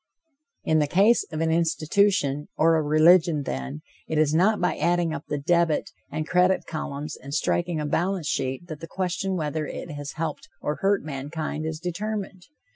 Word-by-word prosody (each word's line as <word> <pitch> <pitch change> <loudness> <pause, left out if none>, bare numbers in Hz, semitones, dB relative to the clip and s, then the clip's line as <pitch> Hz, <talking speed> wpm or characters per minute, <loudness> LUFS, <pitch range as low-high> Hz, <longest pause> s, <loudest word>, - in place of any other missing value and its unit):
In 160 0 +3
the 150 - +2
case 205 +9 +4
of 155 0 -3
an 165 0 +2
institution 160 -2 +1
or 165 +1 +4
a 160 - +2
religion, 155 +1 +4
then, 65 - -4 0.3
it 160 - -2
is 155 -1 +3
not 195 +7 +3
by 180 -2 +1
adding 175 -2 +1
up - - -6
the 150 - -2
debit 170 +1 +1 0.2
and 155 +1 -3
credit 180 +1 +3
columns 150 -2 -5
and 140 +2 -7
striking 170 +1 0
a 150 - -2
balance 175 +2 0
sheet 135 +4 -2
that 155 -4 -8
the 165 - -8
question 190 +1 -2
whether 155 -2 -2
it 175 - -6
has 145 -1 -6
helped 160 -1 -4
or 150 - -2
hurt 195 0 +1
mankind 155 +2 -4
is 160 -1 -4
to 180 - -2
be - - -2
determined. 200 -1 -5
160 Hz, 190 wpm, -25 LUFS, 150-180 Hz, 0.3 s, case